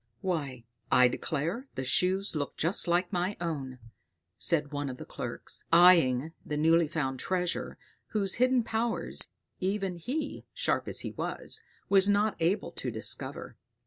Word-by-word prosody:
"Why, 140 -10 -3 0.3
I 125 0 +7
declare 165 - -2
the 130 - -2
Shoes 185 +8 +1
look 145 -2 -3
just 170 +3 +1
like 175 +2 +1
my 180 +3 0
own," 140 -7 -3 0.6
said 150 -4 +1
one 145 -1 -2
of 125 - -6
the - - -8
clerks, - - -5
eying 165 -5 +6
the 150 -2 -3
newly 165 +2 +4
found 135 -4 -2
treasure, 180 +1 -1 0.3
whose 200 -3 0
hidden 255 -1 +4
powers, 225 +1 -2 0.3
even 190 -1 -1
he, 275 - -3
sharp - - 0
as - - -2
he - - -4
was, - - -4 0.3
was 195 0 +5
not 205 +1 +3
able 170 +5 +1
to - - -4
discover. - - -2
170 Hz, 145 wpm, -30 LUFS, 150-195 Hz, 0.6 s, I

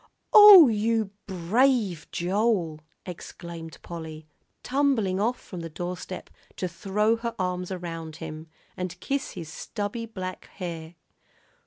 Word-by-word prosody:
"Oh, 415 -7 +11
you 220 -2 0 0.2
brave 195 - +1
Joel!" 180 -3 0 0.3
exclaimed 170 -2 -8
Polly, 160 -2 -8 0.4
tumbling 250 -9 +1
off 235 +4 0
from 180 - -9
the 165 0 -6
doorstep 180 +3 -6 0.2
to 185 - -2
throw 210 +5 0
her 230 0 -4
arms 180 -1 -2
around 165 -3 -6
him, 160 -1 -8 0.3
and 180 -1 -5
kiss 275 +7 -2
his 165 -3 -7
stubby 225 +2 -4
black 185 -4 -6
hair. 170 -3 -7
185 Hz, 120 wpm, -26 LUFS, 170-225 Hz, 0.4 s, Oh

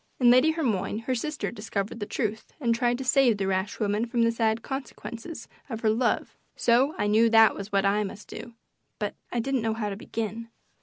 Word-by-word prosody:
In 245 -2 +6
Lady 255 +6 +6
Hermione 230 - -1
her 255 +3 -1
sister 295 +5 -3
discovered 210 -1 -4
the 205 - -4
truth 220 -1 -3
and 235 -5 +2
tried 240 +1 +1
to 265 - -4
save 255 -3 +4
the 195 - -1
rash 190 +1 -1
woman 210 +2 0
from 235 0 +1
the 230 - +3
sad 225 -1 0
consequences 265 +2 -7 0.2
of 225 -3 -5
her 220 - +3
love, 235 +2 0 0.2
so 255 +6 +3
I - - 0
knew 220 +3 +4
that 225 0 +6
was 200 +1 -7
what 200 0 +2
I 205 +2 +2
must 205 +1 -8
do, 235 - -9 0.4
but 210 -1 -3 0.2
I 240 - -1
didn't 265 +1 0
know 220 0 0
how 215 -2 -2
to - - -4
begin. 225 +2 -5
230 Hz, 210 wpm, -27 LUFS, 210-245 Hz, 0.4 s, In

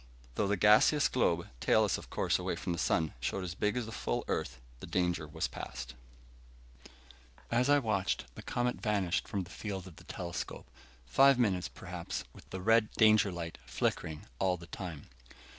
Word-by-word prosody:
Though 100 - 0
the 100 0 +1
gaseous 110 +9 +6
globe, 85 -9 +1
tailless - - +3
of - - -12
course - - +1
away - - -2
from 90 - -3
the 85 - -4
sun, 80 -2 +1
showed 95 - -2
as 90 -2 -4
big 105 +5 0
as 125 - -1
the 110 - -7
full - - -2
Earth, 60 0 -2 0.2
the - - -8
danger 90 -4 0
was 75 - -2
past. - - -7 1.6
As 125 +3 +3
I 145 - +7
watched, 110 - 0
the - - -9
comet 125 0 -1
vanished 100 -5 0
from 100 -2 -2
the 90 - -13
field 95 -4 -5
of 90 -4 -12
the - - -13
telescope. 85 -1 -5 0.4
Five 135 - +6
minutes, 95 -8 +1
perhaps, - - -6
with - - -16
the 95 - -5
red 115 +2 +4
danger 110 -3 +5
light 85 -2 -6
flickering 80 -1 -2
all 95 -1 +2
the 85 - -11
time. 85 -4 -7
95 Hz, 175 wpm, -32 LUFS, 85-110 Hz, 1.6 s, I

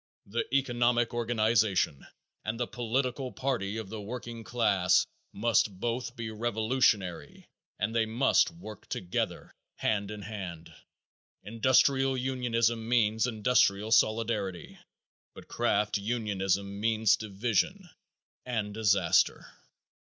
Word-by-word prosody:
The 115 +4 -2
economic 120 -3 +1
organization 110 - +1 0.4
and 110 +2 -3
the 120 - 0
political 125 +2 -2
party 115 -6 -2
of 110 -4 -6
the 110 0 -6
working 115 +1 -7
class 105 -6 +2 0.3
must 105 -3 +1
both 120 +2 -3
be 115 -3 -5
revolutionary 110 -4 0 0.3
and 110 +3 -1
they 115 -1 +2
must 125 +7 +3
work 165 - -11
together 90 -1 -3 0.2
hand 100 -2 -1
in 105 -1 -7
hand. 95 -6 -7 0.7
Industrial 130 +4 +3
unionism 120 -3 0
means 110 -1 +2
industrial 110 -2 +2
solidarity, 110 -6 +1 0.6
but - - -12
craft 105 0 0
unionism 100 -3 -1
means 110 -1 +3
division 120 - -1 0.6
and 110 -5 -3
disaster. 105 -2 +2
110 Hz, 105 wpm, -29 LUFS, 105-120 Hz, 0.7 s, must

